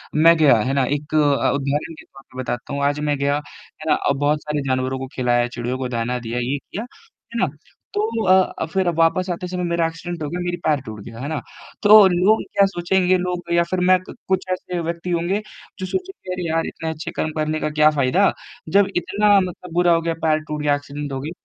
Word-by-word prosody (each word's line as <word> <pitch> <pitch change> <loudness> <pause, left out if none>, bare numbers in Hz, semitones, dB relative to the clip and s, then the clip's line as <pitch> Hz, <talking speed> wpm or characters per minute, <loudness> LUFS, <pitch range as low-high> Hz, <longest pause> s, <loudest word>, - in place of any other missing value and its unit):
मैं 165 +2 +6
गया 145 -7 +6
है 130 +4 -1
ना 135 -2 +2
एक 145 +3 -3
अ - - +5
अ, 145 -2 +3
उदाहरण 140 +3 -2
के - - -14
तौर 135 0 -17
पे 130 - -8
बताता 120 +2 -4
हूँ 140 - -2
आज 145 +1 +1
मैं 145 - +1
गया, 140 +1 +1
है 150 +1 -10
ना? - - +6
अ, - - 0
बहुत 145 +2 +1
सारे 150 -1 -2
जानवरों 130 0 -1
को 130 - -5
खिलाया 120 -1 +2
चिड़ियों 120 +1 -4
को 130 -1 -3
दाना 120 +1 -2
दिया 120 0 -4
ये 130 +4 -1
किया, 200 +9 -7
है 250 - -11
ना? 185 - +3 0.5
तो 220 +2 -1
अ, 185 -3 +3
फ़िर 190 -2 +1
वापस 180 +3 +2
आते 180 +1 -3
समय 180 0 -3
मेरा 170 -1 +1
एक्सीडेंट 165 0 -6
हो 145 - -3
गया 175 - -4
मेरी 175 0 -2
पैर 150 -3 +3
टूट 110 -1 -7
गया, 115 0 -10
है 140 - -4
ना? 155 - -2 0.4
तो 210 -1 +9
लोग 185 +5 +3
क्या 200 - +5
सोचेंगे 185 0 +1
लोग 180 -1 -3
या 170 0 +4
फ़िर 185 - 0
मैं 185 - +7
कुछ 190 0 -2
ऐसे 180 -1 -3
व्यक्ति 170 +2 -4
होंगे 175 +5 0 0.4
जो 185 - -3
सोचेंगे 370 - -5
अरे 180 -2 -3
यार 165 0 0
इतने 160 - -5
अच्छे 160 0 -5
कर्म 155 - -1
करने 155 0 0
का - - -1
क्या 150 0 +4
फ़ायदा? 150 +8 +3 0.4
जब 200 0 +4
इतना 205 +3 +3
मतलब 180 -2 -5
बुरा 175 0 +4
हो 165 - +2
गया 165 0 -1
पैर 155 -1 +3
टूट 150 0 -3
गया 145 -1 +3
एक्सीडेंट 145 0 -6
हो 135 - -3
गई। 155 +3 -5
160 Hz, 230 wpm, -21 LUFS, 140-180 Hz, 0.5 s, तो